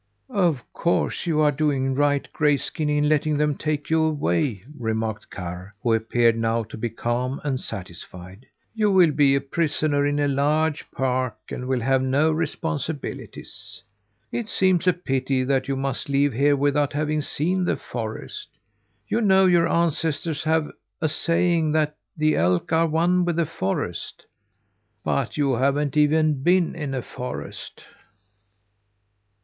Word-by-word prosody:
"Of 170 - +1
course 170 +1 0
you 155 -2 +2
are 150 -1 +4
doing 135 -2 0
right, 145 0 +1
Grayskin, 150 +1 0
in 150 0 +2
letting 150 0 +2
them 150 -1 +1
take 150 0 -3
you 160 0 +4
away," 120 - 0
remarked 110 -3 -3
Karr, 90 +2 -7
who 115 -2 +2
appeared 115 +1 +2
now 115 0 0
to 110 - -10
be 120 +2 -3
calm 120 +4 -2
and 135 -3 -1
satisfied. 90 +3 -8 0.3
"You 215 -2 +2
will 180 -4 +5
be 140 -2 +4
a 140 - +1
prisoner 145 0 0
in 145 0 0
a 145 - +2
large 150 +2 0
park 130 -2 -1 0.2
and 125 - -5
will 130 -2 0
have 130 +2 +2
no 140 +4 +2
responsibilities. 160 -2 -5 0.5
It 230 -2 -3
seems 185 -1 +2
a 180 - +6
pity 135 -5 -1
that 130 0 0
you 135 - -1
must 135 0 -3
leave 140 0 +2
here 145 +4 +3
without 145 0 +1
having 150 +1 0
seen 180 +6 0
the - - 0
forest. 110 - -6 0.6
You 230 - 0
know 190 -3 +5
your 175 -2 +4
ancestors 165 -2 0
have 160 -1 +2 0.3
a 160 -3 0
saying 165 0 +1
that 150 -1 +1 0.2
'the 155 0 +2
elk 90 - +1
are 165 +1 +4
one 170 +3 +2
with 175 -1 0
the 170 0 +1
forest.' 95 -11 -4 0.8
But 135 -1 -1
you 140 -3 +2
haven't 140 +2 +1
even 150 -1 +3
been 175 +2 +3
in 145 -4 -4
a 130 - -3
forest!" 125 - -7
145 Hz, 150 wpm, -24 LUFS, 130-160 Hz, 0.8 s, a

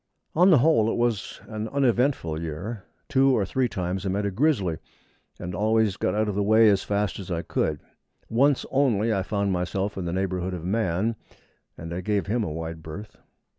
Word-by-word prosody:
On 180 +4 +5
the 170 - +7
whole, 120 -5 +4
it - - -1
was 120 -5 -1
an 110 0 -4
uneventful 125 - +1
year. 90 +7 -5 0.2
Two 135 -1 +3
or 100 - +1
three 125 +6 0
times 90 0 -3
I 100 - -1
met 100 +2 -1
a 100 - -1
grizzly, 100 - +1 0.6
and 90 - -5
always 110 +1 +2
got 90 - -1
out 110 0 +1
of 105 - -1
the 100 - 0
way 110 +2 +5
as 100 -1 +2
fast 105 0 -1
as 95 - -8
I 85 -1 -2
could. 75 -2 -1 0.5
Once 135 +4 +2
only 115 -5 +2
I 100 - +1
found 100 +1 -1
myself 95 +3 -2
in 90 - -3
the 85 - -2
neighbourhood 95 -1 -2
of 85 -1 -7
man, 105 +2 0 0.6
and 85 +1 -7
I 90 - -3
gave 100 -1 0
him 110 +4 0
a 80 - -3
wide 80 0 -5
berth. 95 +7 -9
100 Hz, 200 wpm, -25 LUFS, 90-115 Hz, 0.6 s, the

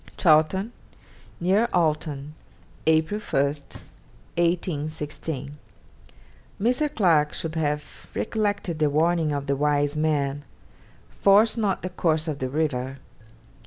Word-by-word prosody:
'Chawton, 175 +6 +3 0.7
near 195 +7 +2
Alton, 150 -3 0 0.5
April 160 +6 +2
1, 140 -9 +1 0.9
1816.' 155 -4 -2 1.0
Mr. 255 +8 +1
Clarke 160 -7 +3
should 160 -1 -4
have 150 -2 -3
recollected 205 -6 -1
the 150 -1 +3
warning 160 +1 +2
of 140 -1 -2
the 140 0 0
wise 145 0 +1
man, 145 -2 0 0.7
'Force 205 +3 +4
not 210 -5 -1
the 185 - -2
course 160 -3 0
of 150 -3 -3
the 130 - -2
river.' 135 -3 -1
155 Hz, 105 wpm, -25 LUFS, 145-180 Hz, 1.0 s, Force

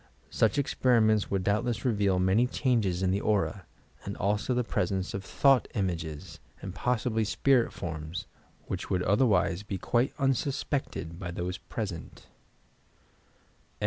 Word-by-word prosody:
Such 110 +2 +2
experiments 115 -6 +3
would 95 -2 0
doubtless 110 +5 0
reveal 100 -6 +2
many 95 +7 +3
changes 110 -9 0
in 95 - +2
the 100 +2 0
Aura, 100 -2 0 0.4
and - - -5
also 105 +5 0
the 125 - +1
presence 95 -4 -1
of 100 - -4
Thought 135 +5 +3
Images 85 -4 -3 0.2
and 95 - -7
pos 125 +2 0
sibly 110 -2 +1
Spirit 125 +3 +2
Forms 80 0 -5 0.4
which - - -5
would 90 -1 +1
otherwise 95 -4 +2
be 105 -2 -4
quite 120 +7 0
unsus 135 0 0
pected 85 - -3
by 90 -3 -5
those 90 +2 -4
present. 95 -7 -6
100 Hz, 140 wpm, -29 LUFS, 90-120 Hz, 0.4 s, experiments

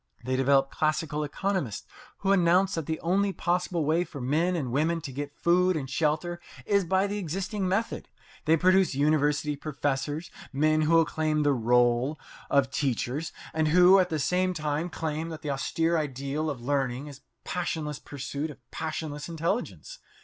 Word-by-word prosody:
They 130 0 0
develop 135 +1 +3
classical 155 -1 0
economists 150 - -2 0.4
who 195 - +2
announce 185 +1 +4
that 165 -5 -3
the 160 -1 -2
only 195 +4 +1
possible 175 -3 -1
way 160 +4 +2
for 155 -5 -9
men 155 +8 +1
and 135 -8 -2
women 160 +6 +1
to 145 -4 -6
get 145 +2 -6
food 180 +1 +3
and 135 -3 -4
shelter 155 +5 -1 0.3
is 200 -2 +2
by 190 +3 +2
the 205 +1 -2
existing 195 +3 -2
method. 200 +5 -1 0.4
They 160 +1 +4
produce 185 -1 +3
university 150 +1 +2
professors, 145 +2 -3 0.2
men 155 +2 +2
who 165 +1 +4
claim 155 -1 0
the 145 -1 +3
role 120 +3 +2 0.3
of 135 -1 +3
teachers, 135 +2 -1 0.2
and 155 0 +1
who 180 +4 +7
at 180 -1 +2
the 160 - -1
same 180 +5 +1
time 155 +2 -2
claim 160 0 -3
that 160 -2 -8
the 150 - -2
austere 165 +5 0
ideal 140 +2 -2
of 140 -5 -4
learning 135 0 -1
is 140 -2 -11 0.2
passionless 160 -5 -3
pursuit 140 +2 -5
of 150 - -10
passionless 155 -1 -4
intelligence. 195 - -3
155 Hz, 165 wpm, -27 LUFS, 140-175 Hz, 0.4 s, who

